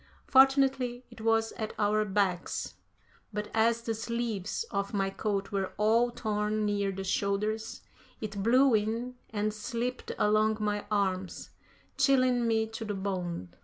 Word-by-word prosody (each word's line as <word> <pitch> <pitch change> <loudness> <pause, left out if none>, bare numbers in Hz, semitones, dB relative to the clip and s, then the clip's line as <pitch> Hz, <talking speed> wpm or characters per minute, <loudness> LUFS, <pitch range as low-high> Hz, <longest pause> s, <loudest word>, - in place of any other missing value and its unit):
Fortunately, 265 -2 +4
it - - -12
was 225 0 +2
at 220 -1 -4
our 215 0 +2
backs, 190 -3 -1 0.6
but 210 0 -4
as 230 +1 +2
the 230 - -1
sleeves 225 - -2
of 200 +1 -2
my 195 -1 0
coat 200 -1 -2
were 195 -2 -2
all 225 +4 +3
torn 215 -2 -1
near 200 -1 0
the 195 0 -5
shoulders, 205 +3 -1 0.4
it 210 -2 -4
blew 255 +5 +5
in 225 +4 0 0.2
and 210 0 -1
slipped 235 +4 -3
along 215 +1 +3
my 210 -1 -1
arms, 190 -3 -1 0.5
chilling 255 -3 +3
me 220 -1 +2
to 220 +1 -7
the 210 -2 -3
bone. 180 - -3
215 Hz, 140 wpm, -30 LUFS, 200-235 Hz, 0.6 s, blew